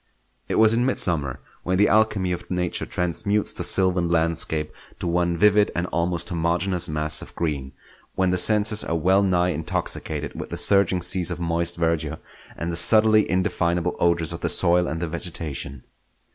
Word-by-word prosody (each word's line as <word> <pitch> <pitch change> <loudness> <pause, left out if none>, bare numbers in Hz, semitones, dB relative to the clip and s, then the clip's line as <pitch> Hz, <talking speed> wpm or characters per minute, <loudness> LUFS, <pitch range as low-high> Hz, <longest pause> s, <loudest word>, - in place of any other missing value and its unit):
It - - -1
was 110 0 +4
in 120 +1 +1
mid 130 - -1
summer, 75 -8 -1 0.2
when 90 +1 -1
the 105 - +4
alchemy 105 -4 +1
of 90 - -6
Nature 90 -1 -3
transmutes 100 +4 -1
the - - -4
sylvan 90 -2 +2
landscape 80 -2 0 0.2
to - - -7
one 85 0 0
vivid 105 +2 +3
and 85 - -1
almost 85 +3 -2
homogeneous 85 +1 0
mass 75 0 +2
of - - -12
green; 70 -5 -4 0.4
when 95 -1 +1
the 90 - 0
senses 105 +2 +3
are 85 - -3
well 95 +4 +2
nigh 90 -2 +1
intoxicated 80 -2 -4
with - - -8
the - - -5
surging 95 -3 +3
seas 90 -1 +2
of 85 -1 -5
moist 85 0 0
verdure 80 -2 -1 0.4
and 85 +1 -4
the - - -4
subtly 110 +4 +4
indefinable 90 -1 -1
odours 85 -1 +1
of 85 - -8
the - - 0
soil 90 0 +4
and 80 +1 -4
the - - -2
vegetation. 80 -5 -4
85 Hz, 175 wpm, -22 LUFS, 85-95 Hz, 0.4 s, was